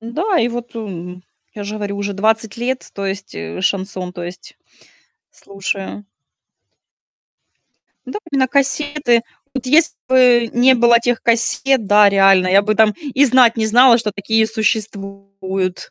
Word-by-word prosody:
Да, 325 - -2
и 230 - +1
вот, 240 0 -7
эм, 180 -4 -8 0.3
я 205 -1 -8
же 210 +1 -6
говорю, 205 -1 -5
уже 200 0 -4
20 220 +2 -1
лет, 255 +2 -4
то 200 - -6
есть, 195 0 -6
э, 85 +2 -7
шансон, 185 - -3
то 175 - -8
есть, 175 +2 -10 0.7
слушаю. 195 +1 -6 2.0
Да, - - -6
были 275 - -1
на 260 - +3
кассеты. 280 -3 0 0.3
Вот 265 -2 -5
если 310 +5 +3
бы, 245 -3 +4
не 255 +2 +4
было 235 -1 +4
тех 245 0 -2
кассет, 235 +1 +1
да, 205 0 +5
реально 195 -2 +4
я 195 +2 +5
бы, 215 +1 -1
там, 220 -1 +3
и 285 -1 +1
знать 250 -2 +4
не 220 -1 0
знала, 240 +2 +5
что 215 -3 -3
такие 220 +3 0
существуют. 195 -4 -4
220 Hz, 150 wpm, -17 LUFS, 195-245 Hz, 2.0 s, да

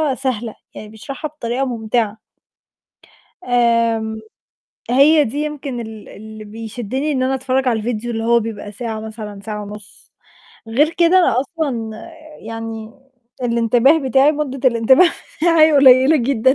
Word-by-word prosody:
سهلة، 240 -5 -3 0.2
يعني 210 - -9
بيشرحها 270 +7 -7
بطريقة 265 -2 -3
مُمتِعة. 225 -2 -2 1.3
آمم، 230 -2 +1 0.7
هي 290 +4 +5
دي 255 +6 -4
يمكن 290 -4 -4
ال 220 -2 -9
اللي 215 +1 -11
بيشدّني 230 +6 -4
إن 260 -2 -1
أنا 265 +1 0
أتفرّج 265 0 0
على 230 -2 +1
الفيديو 235 +1 -3
اللي 225 -1 -3
هو 235 0 +3
بيبقى 210 -2 -6
ساعة 220 0 -5
مثلًا 215 -2 -8
ساعة 210 0 -6
ونُص، 210 0 -10 0.6
غير 290 +8 +2
كده 345 +2 +4
أنا 255 -8 +3
أصلًا 270 -7 -3 0.6
يعني 225 -1 -7 0.5
الإنتباه 240 +5 +3
بتاعي 270 +4 +4
مدّة 275 -3 0
الإنتباه 240 +8 +4 0.4
هي 345 - +4
حاجة 310 -1 +6
قليلة 265 +2 +6
جدًا. 260 0 +2
235 Hz, 135 wpm, -18 LUFS, 220-270 Hz, 1.3 s, حاجة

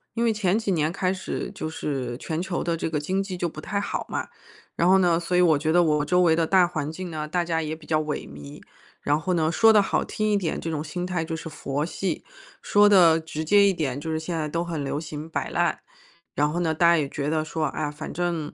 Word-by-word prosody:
因 235 - +1
为 225 - +3
前 205 -1 +1
几 210 -3 -1
年 155 -2 +1
开 185 +1 0
始， 185 - -5
就 155 - -4
是 130 -6 -4
全 160 +4 -3
球 180 -1 -2
的 170 -1 0
这 165 - -3
个 155 - -1
经 190 +6 -1
济 185 -2 -6
就 175 - -1
不 155 -1 -8
太 200 +3 -2
好 - - -3
嘛， - - -3 0.5
然 170 - +2
后 190 - +7
呢， 175 -3 +3
所 175 +1 -2
以 180 - +4
我 165 -4 +5
觉 155 +2 0
得 175 - +5
我 150 -2 +1
周 180 +2 +3
围 165 -2 +4
的 165 0 +2
大 185 0 +4
环 155 -4 -3
境 180 +2 -6
呢， 155 -2 -4
大 175 +2 -1
家 165 -1 0
也 155 0 -3
比 160 -1 -15
较 155 -1 +2
萎 150 -1 -4
靡， 70 0 -11 0.4
然 145 +1 +1
后 180 +3 -1
呢， 160 -2 +2
说 225 +5 +6
得 215 -1 +6
好 195 - 0
听 215 0 -2
一 205 - +3
点 180 -5 -1
这 165 - -4
种 155 -1 -2
心 175 +4 -4
态 180 -3 -2
就 160 0 -4
是 165 - -8
佛 145 -1 -3
系， 190 +2 -3 0.4
说 205 0 +4
得 175 -5 +6
直 160 -1 -5
接 200 +4 +5
一 200 - +5
点， 140 -6 -2
就 160 +2 -4
是 160 - -1
现 165 +1 -4
在 155 -1 -2
都 170 +2 -1
很 165 -4 -4
流 145 +2 -2
行 155 0 -7
摆 - - -3
烂。 175 0 0 0.6
然 150 +1 +2
后 170 - -2
呢， 165 -2 +1
大 165 +2 +2
家 170 - +5
也 150 -3 0
觉 145 +1 -3
得 155 0 0
说， 160 0 -2
哎 - - -5
呀， 145 - -2
反 150 +1 -7
正 170 -3 -2
165 Hz, 290 characters per minute, -25 LUFS, 155-180 Hz, 0.6 s, 后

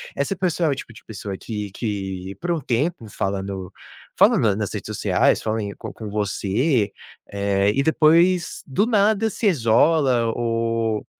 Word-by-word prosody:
essa 140 +7 -1
pessoa 175 -2 0
é - - +2
o - - 0
tipo 115 -3 -9
de 115 - -15
pessoa 100 -2 -6
que 105 -3 -5
que 95 -4 -4
por 175 0 -1
um 165 -3 -1
tempo 130 +1 -1
falando 95 -1 -3 0.5
falando 105 -3 +4
nas 105 -2 -3
redes - - -5
sociais, - - +1
falem 110 -2 -2
com - - -7
com 110 -2 -7
você. 105 - 0 0.4
Eh, 100 0 +1
e 135 - +2
depois 170 +3 +3
do 170 +10 +1
nada, 220 -1 +2
se 215 - -1
isola 130 - +3
ou 115 -2 -1
115 Hz, 155 wpm, -22 LUFS, 100-160 Hz, 0.5 s, falando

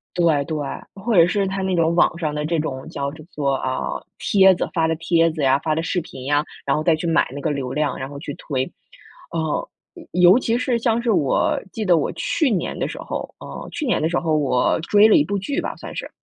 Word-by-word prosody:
对 165 -5 +3
对， 155 +2 -4 0.4
或 210 +4 -2
者 170 -2 +7
是 195 +3 0
他 195 +1 -3
那 190 0 -1
种 165 0 +2
网 170 -1 +3
上 155 -3 -2
的 150 0 -2
这 165 +1 0
种 135 -4 -4
叫 140 0 -3 0.2
做， 140 -2 0
啊， 130 -1 -2 0.4
帖 190 -1 +5
子 - - -3
发 165 -3 +2
的 160 - +1
帖 165 0 +2
子 155 - -5
呀， 135 -1 +4
发 155 +1 -1
的 160 - 0
视 180 +2 -1
频 130 -5 -10
呀， 145 +1 +2 0.2
然 - - +2
后 155 - -1
再 165 0 +4
去 160 +2 -4
买 165 0 +2
那 140 - -5
个 155 - 0
流 135 -4 -3
量， 150 +2 -1
然 130 - -5
后 140 0 -8
去 145 -1 -6
推。 130 -2 -3 0.6
呃， 160 -2 -2 0.4
尤 180 0 +6
尤 240 - +4
其 235 -2 0
是 250 -1 0
像 235 0 +1
是 235 -1 +1
我 145 -10 +2
记 220 - -4
得 175 -3 +5
我 - - 0
去 355 - 0
年 190 -7 -1
的 - - -1
时 - - -7
候 - - -5
呃， - - -8
去 310 - -3
年 245 - +1
的 160 - +1
时 175 - +1
候 160 -2 0
我 135 -4 +2
追 205 +5 +5
了 220 - +5
一 - - +5
部 200 +6 -2
剧 275 +9 -2
吧 - - -4
算 - - -9
是， - - -5
165 Hz, 265 characters per minute, -21 LUFS, 150-190 Hz, 0.6 s, 者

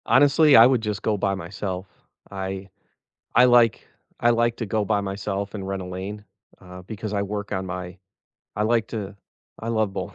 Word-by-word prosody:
Honestly, 145 +2 +5
I 115 - +10
would 125 -2 +3
just 105 -2 -3
go 110 -2 +1
by 100 0 0
myself, 95 0 -5 0.5
I 95 0 -5 0.7
I 125 - +7
like 120 -2 +4 0.3
I 120 - +4
like 120 0 +1
to 115 - -3
go 110 +1 0
by 105 0 +1
myself, 100 0 -4
and 100 -3 -5
rent 95 0 -3
a - - -7
lane, 95 +3 -6 0.3
uh, 90 -1 -11
because 105 +2 -6
I 100 - 0
work 100 0 -4
on 95 -2 -2
my 90 0 -6 0.6
I 105 - 0
like 115 0 +2
to 105 -3 -6 0.4
I 115 - -6
love 110 -3 0
bowling, 95 +1 -5
100 Hz, 190 wpm, -24 LUFS, 95-115 Hz, 0.7 s, I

